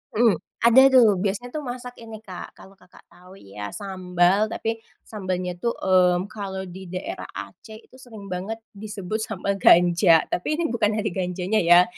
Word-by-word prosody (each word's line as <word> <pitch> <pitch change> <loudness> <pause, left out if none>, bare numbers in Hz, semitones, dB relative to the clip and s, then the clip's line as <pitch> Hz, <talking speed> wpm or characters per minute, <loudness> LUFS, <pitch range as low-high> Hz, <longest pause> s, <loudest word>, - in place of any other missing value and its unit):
Mhm, 230 -1 +4 0.3
ada 235 +3 +7
tuh 240 -3 +8 0.2
biasanya 210 +5 -2
tuh 305 - -1
masak 250 0 -8
ini 225 -1 -10
Kak, 185 -4 -9
kalau 190 - -15
Kakak 180 0 -20
tahu 180 +2 -16
ya 105 - -9
sambal, 185 +1 +1
tapi 225 0 -3 0.2
sambalnya 185 -4 -4
tuh, 235 +2 -1
mmm, 185 +1 +2
kalau 195 -2 -5
di 185 0 -10
daerah 180 +1 -6
Aceh 220 - -9
itu - - -21
sering 215 -6 -11
banget 215 +5 -5
disebut 210 0 -5
sambel 200 -1 -3
ganja. 170 -1 +5
Tapi 240 +12 -1
ini 325 -6 -1
bukan 215 -2 +1
dari 215 -1 -1
ganjanya 185 +3 -1
ya, 175 +1 +6
195 Hz, 165 wpm, -23 LUFS, 180-220 Hz, 0.3 s, tuh